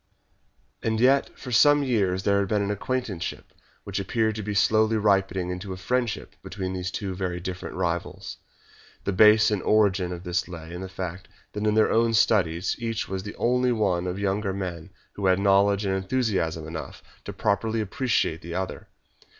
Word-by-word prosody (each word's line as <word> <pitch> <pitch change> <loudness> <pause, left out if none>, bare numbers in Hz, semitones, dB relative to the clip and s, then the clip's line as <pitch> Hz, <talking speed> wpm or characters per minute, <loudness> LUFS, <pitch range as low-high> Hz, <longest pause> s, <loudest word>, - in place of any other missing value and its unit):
And 110 0 0
yet 135 +3 +4
for 125 - -8
some 145 +5 +5
years 100 -8 0
there 100 0 +3
had 100 - 0
been 105 +1 +1
an 100 - -1
acquaintanceship 105 -3 -4 0.3
which 100 0 -3
appeared 110 +3 0
to 110 - -5
be 105 0 -4
slowly 110 +2 +3
ripening 95 -3 +1
into 90 +2 -5
a - - -7
friendship 120 +3 -2
between 95 -1 -5
these 90 0 -3
two 95 0 -4
very 90 -1 -3
different 95 +1 -6
rivals. - - -3 0.7
The - - -1
base 105 +2 +6
and 105 -3 0
origin 100 -4 +2
of 90 0 -6
this 90 0 -1
lay 85 -2 -9
in 90 - -6
the 95 - -6
fact 95 -1 -6 0.3
that 105 +1 -2
in 105 - +2
their 110 - +4
own 115 0 +3
studies 90 -5 +2
each 115 -2 -2
was 95 0 -3
the 105 +2 -8
only 125 +1 +2
one 95 -6 0
of 90 - -2
the 100 - -5
younger 100 0 0
men 90 -3 -5 0.2
who 100 -2 -1
had 95 0 +4
knowledge 100 +1 +3
and 95 - 0
enthusiasm 95 -6 -1
enough 80 -3 -7 0.2
to - - -5
properly 110 +2 0
appreciate 105 - 0
the 85 0 -7
other. 95 0 -4
100 Hz, 185 wpm, -25 LUFS, 90-110 Hz, 0.7 s, base